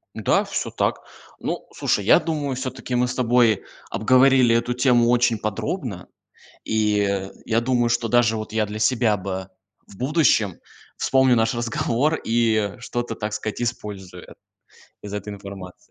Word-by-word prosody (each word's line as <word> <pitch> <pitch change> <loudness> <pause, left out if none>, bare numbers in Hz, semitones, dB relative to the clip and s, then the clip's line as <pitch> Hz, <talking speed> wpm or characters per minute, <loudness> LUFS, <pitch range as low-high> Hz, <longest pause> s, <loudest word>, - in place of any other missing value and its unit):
Да, - - +2
всё - - -4
так. - - -1 0.4
Ну, - - -4
слушай, 100 - 0
я 110 - +6
думаю, 145 -6 -2
всё-таки 130 -1 -4
мы 125 0 +2
с 125 - -4
тобой 120 -4 +3 0.3
обговорили 130 +1 +4
эту 120 +1 0
тему 120 -2 +3
очень 120 -2 +3
подробно, 110 - -4 0.6
и, 105 -3 0 0.2
я 115 +1 +1
думаю, 120 -1 +1
что 120 0 0
даже 115 -1 +3
вот 110 0 -7
я 110 -1 +1
для 105 +1 -6
себя 110 -1 +2
бы 95 0 -5 0.4
в 95 - -15
будущем 125 - +2 0.4
вспомню 130 -2 +3
наш 115 +1 +1
разговор 120 +5 0
и 110 -3 +1
что-то 120 -1 -4
так 105 -1 -4
сказать 110 +2 -4
использую 100 -6 -6 0.7
из 105 -1 -7
этой 105 0 -5
информации. 100 -2 -10
115 Hz, 145 wpm, -22 LUFS, 105-125 Hz, 0.7 s, я